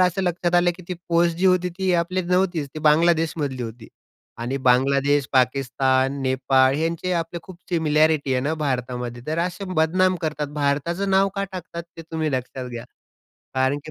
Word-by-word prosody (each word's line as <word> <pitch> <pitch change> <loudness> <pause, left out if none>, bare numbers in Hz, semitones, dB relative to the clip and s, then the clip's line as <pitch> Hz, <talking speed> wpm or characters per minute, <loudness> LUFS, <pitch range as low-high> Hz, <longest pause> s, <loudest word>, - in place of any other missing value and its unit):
असं 185 +1 +2
लक्षात 175 -1 0
आलं 175 0 +4
की 185 - -12
ती 180 - -2
पोस्ट 170 0 +2
जी 190 - +2
होती, 180 -1 +3
ती 185 +1 -1
आपली 185 +2 -1
नव्हतीच 180 -2 +1
तर - - -21
ती - - -4
बांगलादेशमधली 155 -4 +2
होती. 115 0 -8 0.5
आणि 120 +4 -3
बांगलादेश, 140 +2 +3
पाकिस्तान 130 +1 +1
नेपाळ 130 0 +3
यांचे 165 +3 -1
आपली 165 +1 -6
खूप 185 -3 -12
सिमिलॅरिटी 155 -3 +2
आहे 130 - +1
ना 150 - 0
भारतामध्ये. 125 -4 -3
तर 155 +2 -2
असे 175 +2 -3
बदनाम 185 +4 +2
करतात 150 -1 -2
आणि 145 - -13
भारताचं 150 +7 0
नाव 195 +1 +4
का 200 -1 -1
टाकतात 170 -2 -6
ते 165 - -8
तुम्ही 160 -1 -1
लक्षात 130 0 -4
घ्या. 120 0 -6 0.7
कारण 130 +2 +1
की 155 - -8
155 Hz, 175 wpm, -23 LUFS, 135-175 Hz, 0.7 s, आलं